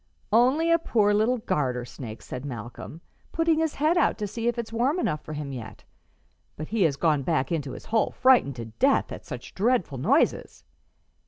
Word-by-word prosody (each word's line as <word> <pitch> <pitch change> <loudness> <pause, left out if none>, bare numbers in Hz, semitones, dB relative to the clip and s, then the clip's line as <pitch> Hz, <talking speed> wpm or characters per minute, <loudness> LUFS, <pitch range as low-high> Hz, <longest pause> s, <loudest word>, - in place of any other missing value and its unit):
"Only 265 +9 +4
a 335 - +5
poor 210 -9 +2
little 220 +5 +2
garter 130 - -1
snake," 115 -3 -9
said 125 - -7
Malcolm, 125 +4 -8 0.3
"putting 330 -1 +2
his 320 -2 0
head 315 +4 +2
out - - +2
to 210 - -3
see 225 +3 -4
if 240 - 0
it's 230 -1 -5
warm 255 +8 +1
enough 155 - -1
for 155 - -8
him 145 -2 -5
yet. 110 -5 -8 0.7
But 155 - -7
he 225 -1 -1
has 145 -4 +1
gone 150 -1 +1
back 130 +1 0
into 145 -5 -2
his - - -10
hole 225 0 +1
frightened 250 - +3
to 115 -2 -6
death 110 0 +1
at - - -9
such 125 -1 -8
dreadful 195 - 0
noises. - - +1
190 Hz, 190 wpm, -26 LUFS, -, 0.7 s, a